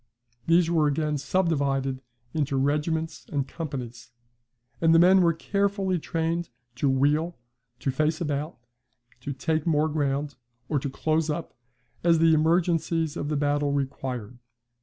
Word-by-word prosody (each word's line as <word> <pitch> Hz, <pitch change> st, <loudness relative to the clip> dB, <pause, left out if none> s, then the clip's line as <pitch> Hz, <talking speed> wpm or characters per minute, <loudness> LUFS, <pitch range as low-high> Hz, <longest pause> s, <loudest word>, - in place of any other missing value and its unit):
These 170 Hz, 0 st, +4 dB
were 160 Hz, -3 st, +2 dB
again 150 Hz, 0 st, 0 dB
subdivided 140 Hz, -6 st, 0 dB, 0.3 s
into 140 Hz, -3 st, 0 dB
regiments 150 Hz, +4 st, -1 dB
and 140 Hz, -3 st, -1 dB
companies; 125 Hz, -7 st, -6 dB, 0.7 s
and 165 Hz, 0 st, +5 dB
the -, -, +8 dB
men 185 Hz, +3 st, +6 dB
were 170 Hz, -1 st, +4 dB
carefully 195 Hz, +1 st, 0 dB
trained 165 Hz, +2 st, -2 dB, 0.3 s
to 140 Hz, +2 st, +2 dB
wheel, 150 Hz, +6 st, +1 dB, 0.4 s
to 135 Hz, -, 0 dB
face 155 Hz, +4 st, 0 dB
about, 150 Hz, 0 st, -3 dB, 0.6 s
to 135 Hz, +3 st, -5 dB
take 155 Hz, +3 st, -1 dB
more 155 Hz, -1 st, +3 dB
ground, 145 Hz, -2 st, -1 dB, 0.3 s
or 145 Hz, -1 st, 0 dB
to 140 Hz, -, -3 dB
close 155 Hz, +3 st, 0 dB
up, 155 Hz, +2 st, -3 dB, 0.5 s
as 170 Hz, -1 st, +5 dB
the 165 Hz, 0 st, +5 dB
emergencies 165 Hz, 0 st, +1 dB
of 145 Hz, -, -3 dB
the 150 Hz, -, 0 dB
battle 145 Hz, 0 st, +1 dB
required. 130 Hz, -4 st, -4 dB
155 Hz, 140 wpm, -26 LUFS, 140-165 Hz, 0.7 s, the